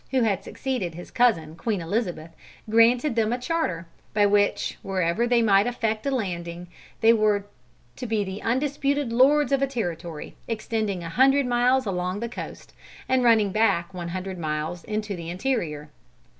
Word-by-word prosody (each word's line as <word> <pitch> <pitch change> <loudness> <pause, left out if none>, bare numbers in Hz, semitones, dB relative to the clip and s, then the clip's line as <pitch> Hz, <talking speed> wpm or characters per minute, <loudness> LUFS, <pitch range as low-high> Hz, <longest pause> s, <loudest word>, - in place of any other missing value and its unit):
who 260 -2 +2
had 205 -4 0
succeeded 240 -11 -3
his 175 - -10
cousin 165 -11 +2
Queen 210 +2 -2
Elizabeth, 170 -2 -3 0.4
granted 230 +4 +4
them 225 -1 +1
a 245 - 0
charter, 250 - -2 0.3
by 205 -1 +5
which, 205 0 +1
wherever 190 +4 0
they 240 -1 +3
might 200 0 +4
effect 225 0 -2
a - - +3
landing, 175 -8 -3 0.4
they 225 0 +6
were 210 -2 +2 0.5
to 250 - -6
be 220 -2 0
the 190 +1 -6
undisputed 275 +1 0
lords 280 +4 +4
of 275 -1 +2
a 275 - +2
territory 175 - -5
extending 215 -4 -2
a 165 - -5
hundred 270 +7 +4
miles 250 +1 +2
along 180 0 -2
the 235 - -3
coast, 240 - -8 0.3
and 260 -1 +2
running 220 -4 +4
back 195 -4 +1
one 175 -2 -5
hundred 185 +1 -5
miles 155 +2 -3
into 210 -1 -3
the 170 -1 -7
interior. 170 - -2
215 Hz, 165 wpm, -25 LUFS, 180-245 Hz, 0.5 s, they